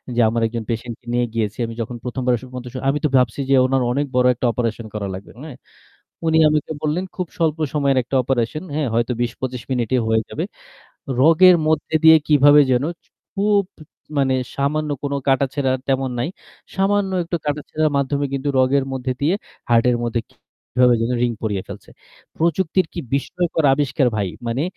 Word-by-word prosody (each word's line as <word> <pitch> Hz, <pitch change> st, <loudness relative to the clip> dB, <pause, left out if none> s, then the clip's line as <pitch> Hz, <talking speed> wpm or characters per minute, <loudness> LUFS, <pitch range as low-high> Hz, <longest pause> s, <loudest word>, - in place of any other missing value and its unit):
যে -, -, 0 dB
আমার 115 Hz, +1 st, -1 dB
একজন 115 Hz, 0 st, -5 dB
patient 115 Hz, 0 st, -3 dB
কে 120 Hz, -, -33 dB
নিয়ে 120 Hz, 0 st, +2 dB
গিয়েছি, 110 Hz, -1 st, -2 dB
আমি 115 Hz, -, -6 dB
যখন 120 Hz, +2 st, -5 dB
প্রথমবারের 125 Hz, -1 st, -1 dB, 0.2 s
মতো 125 Hz, -, -6 dB, 0.2 s
আমি 145 Hz, -, +1 dB
তো -, -, +3 dB
ভাবছি 125 Hz, +1 st, +1 dB
যে -, -, +4 dB
ওনার 130 Hz, 0 st, +1 dB
অনেক 145 Hz, +3 st, 0 dB
বড় 125 Hz, 0 st, +4 dB
একটা 125 Hz, +1 st, -4 dB
operation 115 Hz, -1 st, -3 dB
করা 105 Hz, -2 st, -3 dB
লাগবে, 95 Hz, +2 st, -9 dB
হ্যাঁ? 150 Hz, -5 st, -9 dB, 0.7 s
উনি 160 Hz, 0 st, +3 dB
আমাকে 150 Hz, 0 st, -1 dB
বললেন 155 Hz, +4 st, -1 dB
খুব 180 Hz, -2 st, -3 dB
স্বল্প 160 Hz, -2 st, +1 dB, 0.2 s
সময়ের 140 Hz, -2 st, +2 dB
একটা 130 Hz, -, -4 dB
operation, 130 Hz, +3 st, -1 dB
হ্যাঁ? 150 Hz, -3 st, 0 dB
হয়তো 115 Hz, +2 st, +1 dB
২০-২৫ 125 Hz, +1 st, -3 dB
মিনিটে 125 Hz, -1 st, 0 dB
হয়ে 110 Hz, 0 st, +2 dB
যাবে। -, -, -3 dB, 0.8 s
রগের 170 Hz, +4 st, +7 dB
মধ্যে 155 Hz, 0 st, 0 dB
দিয়ে 160 Hz, 0 st, +9 dB
কিভাবে 145 Hz, 0 st, +6 dB
যেন 125 Hz, +2 st, +2 dB, 0.5 s
খুব 205 Hz, 0 st, +2 dB, 0.6 s
মানে 135 Hz, -1 st, +2 dB, 0.2 s
সামান্য 150 Hz, +2 st, -1 dB
কোনো 140 Hz, 0 st, -2 dB
কাটাছেঁড়া 135 Hz, 0 st, +1 dB, 0.2 s
তেমন 135 Hz, -1 st, 0 dB
নাই। 120 Hz, -, -1 dB, 0.5 s
সামান্য 195 Hz, 0 st, +1 dB
একটু 170 Hz, +1 st, -2 dB
কাটাছেঁড়ার 150 Hz, +1 st, -1 dB
মাধ্যমে 140 Hz, +1 st, 0 dB
কিন্তু 140 Hz, +1 st, -2 dB
রগের 130 Hz, +1 st, +3 dB
মধ্যে 130 Hz, -1 st, -2 dB
দিয়ে 160 Hz, +7 st, +2 dB, 0.3 s
heart 115 Hz, 0 st, +4 dB
এর 120 Hz, -, +2 dB
মধ্যে 115 Hz, 0 st, -1 dB
কিভাবে 125 Hz, 0 st, 0 dB
যেন 115 Hz, +1 st, 0 dB
ring 120 Hz, -1 st, +1 dB
পরিয়ে 105 Hz, -4 st, -1 dB
ফেলছে। -, -, -10 dB, 0.5 s
প্রযুক্তির 170 Hz, +2 st, +1 dB
কি 170 Hz, -, -4 dB
বিস্ময়কর 160 Hz, +3 st, -1 dB
আবিষ্কার 140 Hz, -1 st, +1 dB
ভাই! 100 Hz, -3 st, -1 dB, 0.2 s
মানে 120 Hz, +5 st, -1 dB
135 Hz, 170 wpm, -20 LUFS, 120-155 Hz, 0.8 s, দিয়ে